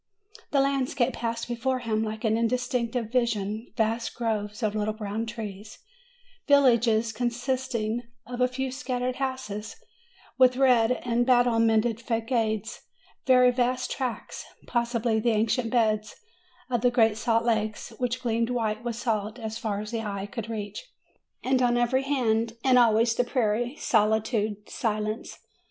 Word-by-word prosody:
The 280 Hz, -, +3 dB
landscape 270 Hz, -2 st, +1 dB
passed 230 Hz, 0 st, -3 dB
before 245 Hz, +2 st, -1 dB
him 225 Hz, -3 st, -1 dB
like 215 Hz, 0 st, -5 dB
an 220 Hz, -1 st, +2 dB
indistinct 235 Hz, +1 st, 0 dB, 0.2 s
vision: 225 Hz, -3 st, -1 dB
vast 225 Hz, +1 st, 0 dB
groves 215 Hz, -1 st, -2 dB
of 210 Hz, -1 st, +1 dB
little 215 Hz, 0 st, -1 dB
brown 215 Hz, +1 st, -4 dB
trees; 210 Hz, -2 st, -7 dB, 0.7 s
villages 235 Hz, -5 st, +4 dB
con 245 Hz, 0 st, 0 dB
sisting 240 Hz, -2 st, -2 dB, 0.3 s
of 245 Hz, 0 st, -5 dB
a 250 Hz, -, +5 dB
few 260 Hz, +1 st, -3 dB
scattered 255 Hz, -2 st, -3 dB
houses, 260 Hz, -6 st, -4 dB, 0.6 s
with 255 Hz, -1 st, +5 dB
red 250 Hz, -3 st, +4 dB
and 240 Hz, 0 st, +2 dB
battle 245 Hz, -2 st, +3 dB
mented 225 Hz, 0 st, +2 dB
fagades; 225 Hz, -2 st, -1 dB, 0.5 s
very 250 Hz, -1 st, +6 dB
vast 250 Hz, +1 st, 0 dB
tracts, 255 Hz, -4 st, -4 dB, 0.2 s
possibly 235 Hz, -2 st, 0 dB
the 235 Hz, +2 st, +1 dB
ancient 225 Hz, +2 st, +1 dB
beds 215 Hz, -3 st, +1 dB, 0.5 s
of 240 Hz, -3 st, -1 dB
great 225 Hz, -3 st, +3 dB
salt 230 Hz, +1 st, +1 dB
lakes, 215 Hz, -2 st, -1 dB
which 250 Hz, 0 st, -2 dB
gleamed 230 Hz, 0 st, 0 dB
white 225 Hz, -2 st, -1 dB
with 240 Hz, -2 st, -3 dB
salt 220 Hz, -2 st, -2 dB
as 220 Hz, -1 st, -5 dB
far 210 Hz, -3 st, -2 dB
as 210 Hz, +1 st, -7 dB
the 230 Hz, -1 st, -2 dB
eye 200 Hz, -2 st, -4 dB
could 225 Hz, +2 st, -6 dB
reach; 210 Hz, -3 st, -5 dB, 0.6 s
and 260 Hz, 0 st, +2 dB
on 240 Hz, -1 st, +3 dB
every 240 Hz, +2 st, +2 dB
hand, 230 Hz, -5 st, 0 dB
and 255 Hz, -2 st, +5 dB
always, 230 Hz, 0 st, +4 dB
the 245 Hz, -, +1 dB
prairie, 240 Hz, 0 st, 0 dB
solitude, 215 Hz, -3 st, +1 dB
silence. 215 Hz, -1 st, -3 dB
230 Hz, 145 wpm, -27 LUFS, 220-250 Hz, 0.7 s, very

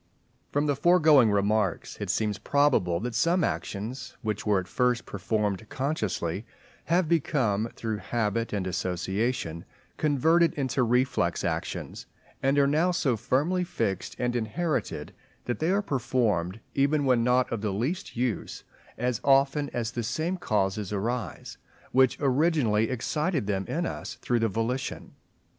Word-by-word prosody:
From 145 Hz, +1 st, 0 dB
the 145 Hz, -1 st, +1 dB
foregoing 150 Hz, -5 st, +5 dB
remarks 100 Hz, -2 st, 0 dB
it -, -, -3 dB
seems 105 Hz, -2 st, 0 dB
probable 130 Hz, -13 st, +2 dB
that 120 Hz, +1 st, -3 dB
some 165 Hz, +8 st, +2 dB
actions, 100 Hz, +9 st, -4 dB
which 105 Hz, -1 st, -3 dB
were 105 Hz, -2 st, +4 dB
at 90 Hz, -, -6 dB
first 125 Hz, +3 st, +1 dB
performed 105 Hz, 0 st, -2 dB
consciously, 105 Hz, -, -2 dB, 0.4 s
have 175 Hz, 0 st, +2 dB
become 130 Hz, -9 st, +1 dB
through 110 Hz, -2 st, -3 dB
habit 115 Hz, +1 st, -1 dB
and 100 Hz, -3 st, -2 dB
association 90 Hz, +1 st, -2 dB, 0.3 s
converted 160 Hz, +3 st, +3 dB
into 135 Hz, -2 st, 0 dB
reflex 125 Hz, -7 st, +1 dB
actions, -, -, -4 dB, 0.3 s
and 135 Hz, +1 st, +2 dB
are 140 Hz, -, +5 dB
now 155 Hz, +6 st, +2 dB
so 140 Hz, -8 st, +1 dB
firmly 150 Hz, -, +1 dB
fixed 95 Hz, -, -2 dB
and 125 Hz, 0 st, -1 dB
inherited, 150 Hz, +8 st, -2 dB, 0.3 s
that 120 Hz, -, -2 dB
they 160 Hz, -, +1 dB
are 200 Hz, +2 st, +2 dB
performed, 115 Hz, -, 0 dB
even 140 Hz, +1 st, +2 dB
when 125 Hz, -3 st, +3 dB
not 125 Hz, +1 st, +2 dB
of 115 Hz, -3 st, -2 dB
the 105 Hz, -, -1 dB
least 130 Hz, -, -3 dB
use, 120 Hz, -3 st, -2 dB, 0.3 s
as 125 Hz, -2 st, -1 dB
often 140 Hz, +1 st, +3 dB
as 115 Hz, -1 st, -2 dB
the 120 Hz, -, -3 dB
same 155 Hz, +10 st, -1 dB
causes 105 Hz, -, -1 dB
arise, 115 Hz, +4 st, -3 dB, 0.3 s
which 130 Hz, -1 st, +4 dB
originally 135 Hz, -6 st, +2 dB
excited 150 Hz, -, -1 dB
them 95 Hz, -2 st, -1 dB
in 170 Hz, +2 st, -1 dB
us 130 Hz, -, -5 dB
through 120 Hz, -1 st, 0 dB
the 115 Hz, 0 st, +1 dB
volition. 115 Hz, +6 st, -3 dB
125 Hz, 145 wpm, -27 LUFS, 105-145 Hz, 0.4 s, foregoing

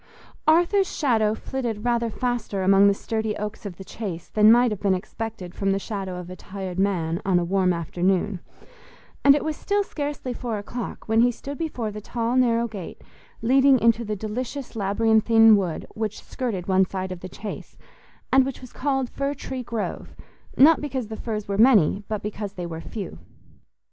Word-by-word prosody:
Arthur's 350 Hz, +4 st, +4 dB
shadow 220 Hz, -7 st, +1 dB
flitted 235 Hz, -4 st, -4 dB
rather 235 Hz, -1 st, +1 dB
faster 230 Hz, -4 st, -2 dB
among 195 Hz, +1 st, +6 dB
the 200 Hz, -, +5 dB
sturdy 220 Hz, 0 st, -2 dB
oaks 210 Hz, +1 st, -5 dB
of 180 Hz, -4 st, -9 dB
the 190 Hz, -, -8 dB
Chase 190 Hz, -4 st, -6 dB
than 215 Hz, 0 st, +6 dB
might 240 Hz, 0 st, +5 dB
have 210 Hz, -, -3 dB
been 195 Hz, -2 st, +2 dB
expected 195 Hz, -1 st, -6 dB
from 195 Hz, -, -1 dB
the 195 Hz, -, +1 dB
shadow 195 Hz, -3 st, -4 dB
of 180 Hz, -1 st, -7 dB
a -, -, -7 dB
tired 185 Hz, -1 st, -6 dB
man 175 Hz, -4 st, 0 dB
on 190 Hz, -2 st, +2 dB
a 175 Hz, -, +2 dB
warm 185 Hz, 0 st, +2 dB
afternoon, 180 Hz, +3 st, 0 dB, 0.8 s
and 280 Hz, 0 st, +7 dB
it 295 Hz, -, -1 dB
was 310 Hz, -1 st, -1 dB
still 405 Hz, +5 st, 0 dB
scarcely 290 Hz, -7 st, -4 dB
four 235 Hz, -3 st, -3 dB
o'clock 230 Hz, +4 st, -6 dB
when 225 Hz, +1 st, +4 dB
he 245 Hz, -, +5 dB
stood 275 Hz, +4 st, -7 dB
before 250 Hz, -10 st, -3 dB
the 210 Hz, +1 st, -7 dB
tall 235 Hz, +3 st, -2 dB
narrow 235 Hz, -2 st, +3 dB
gate 200 Hz, -6 st, -8 dB, 0.4 s
leading 265 Hz, +3 st, +5 dB
into 230 Hz, 0 st, +3 dB
the 215 Hz, -1 st, -3 dB
delicious 245 Hz, +6 st, -5 dB
labyrinthine 225 Hz, +2 st, +5 dB
wood 185 Hz, -5 st, -2 dB
which 215 Hz, -1 st, -4 dB
skirted 215 Hz, -9 st, -4 dB
one 190 Hz, 0 st, +4 dB
side 190 Hz, -1 st, -4 dB
of 185 Hz, -, -6 dB
the 185 Hz, -, -8 dB
Chase, 205 Hz, +3 st, -8 dB, 0.6 s
and 265 Hz, 0 st, +7 dB
which 265 Hz, -1 st, -4 dB
was 255 Hz, -2 st, -12 dB
called 270 Hz, -1 st, 0 dB
Fir 275 Hz, +3 st, -3 dB
tree 260 Hz, -2 st, -5 dB
Grove, 235 Hz, -3 st, -5 dB, 0.4 s
not 305 Hz, +4 st, +7 dB
because 260 Hz, -6 st, -3 dB
the 220 Hz, -, -5 dB
firs 215 Hz, -2 st, -4 dB
were 200 Hz, 0 st, -2 dB
many, 210 Hz, -6 st, +5 dB
but 215 Hz, -2 st, -3 dB
because 205 Hz, -1 st, -5 dB
they 180 Hz, -3 st, -5 dB
were 165 Hz, -1 st, -6 dB
few. 195 Hz, -, -7 dB
220 Hz, 185 wpm, -24 LUFS, 195-245 Hz, 0.8 s, and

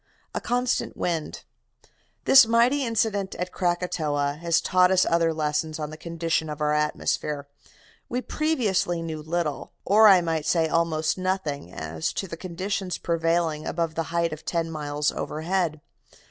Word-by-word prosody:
A -, -, -3 dB
CONSTANT 245 Hz, +1 st, -1 dB
WIND 165 Hz, -3 st, -3 dB, 0.8 s
"This 270 Hz, -4 st, +8 dB
mighty 240 Hz, +5 st, +3 dB
incident 215 Hz, -4 st, 0 dB
at 180 Hz, 0 st, -4 dB
Krakatoa 155 Hz, -5 st, -1 dB
has 170 Hz, -1 st, +2 dB
taught 180 Hz, -1 st, +3 dB
us 185 Hz, -1 st, +4 dB
other 165 Hz, 0 st, +2 dB
lessons 155 Hz, 0 st, -1 dB
on 150 Hz, -1 st, -5 dB
the -, -, -7 dB
constitution 165 Hz, -1 st, -2 dB
of 150 Hz, 0 st, -5 dB
our 150 Hz, 0 st, +1 dB
atmosphere. 150 Hz, -1 st, -1 dB, 0.6 s
We 250 Hz, +1 st, -1 dB
previously 210 Hz, -, 0 dB
knew 160 Hz, -2 st, -5 dB
little, 160 Hz, -2 st, -3 dB
or 215 Hz, +2 st, +6 dB
I 190 Hz, -3 st, +7 dB
might 165 Hz, -3 st, -2 dB
say 165 Hz, -2 st, +2 dB
almost 160 Hz, 0 st, 0 dB
nothing, 185 Hz, -, -2 dB
as 80 Hz, -1 st, -4 dB
to 195 Hz, -, -3 dB
the 165 Hz, -, -6 dB
conditions 185 Hz, +2 st, -3 dB
prevailing 165 Hz, -2 st, 0 dB
above 165 Hz, 0 st, -1 dB
the 165 Hz, -, -1 dB
height 170 Hz, -1 st, 0 dB
of 155 Hz, -, -9 dB
ten 165 Hz, -1 st, -2 dB
miles 150 Hz, -1 st, -1 dB
overhead. 160 Hz, -1 st, -2 dB
165 Hz, 150 wpm, -25 LUFS, 155-185 Hz, 0.8 s, This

